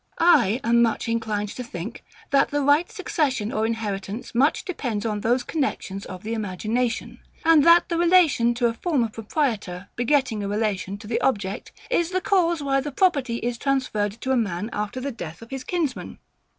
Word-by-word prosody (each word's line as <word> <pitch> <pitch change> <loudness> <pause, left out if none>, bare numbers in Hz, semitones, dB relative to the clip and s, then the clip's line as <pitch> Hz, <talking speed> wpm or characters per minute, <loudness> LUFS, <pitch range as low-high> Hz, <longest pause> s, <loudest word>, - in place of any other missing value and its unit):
I 255 - +4
am 235 +1 +4
much 230 -1 +1
inclined 220 -3 -1
to 250 - -6
think, 220 0 -7 0.3
that 275 0 +4
the 290 0 0
right 295 +8 +3
succession 285 - -1
or 220 +1 0
inheritance 210 -1 -4
much 270 - +2
depends 245 - -3
on 210 -2 -1
those 245 +3 +1
connexions 225 -10 -3
of 185 -1 -8
the 220 +2 -3
imagination, 225 +3 -2 0.3
and 325 -3 +6
that 340 +1 +7
the 335 - -1
relation 335 -9 +4
to 240 0 0
a 230 - +2
former 250 -3 0
proprietor 210 - -2
begetting 245 -3 +1
a - - -2
relation 205 -2 -1
to 205 - -13
the 225 +2 -1
object, 200 -7 -1 0.2
is 345 -8 +2
the 370 0 0
cause 345 -5 +1
why 275 -1 +2
the 295 +2 -5
property 275 -7 +2
is 240 -1 -2
transferred 255 -7 0
to 265 - -1
a - - +4
man 210 -2 -1
after 210 +4 -3
the 275 +2 -3
death 175 -4 -8
of 230 - -14
his 265 -1 -5
kinsman. 335 -7 -3
235 Hz, 185 wpm, -24 LUFS, 210-285 Hz, 0.3 s, that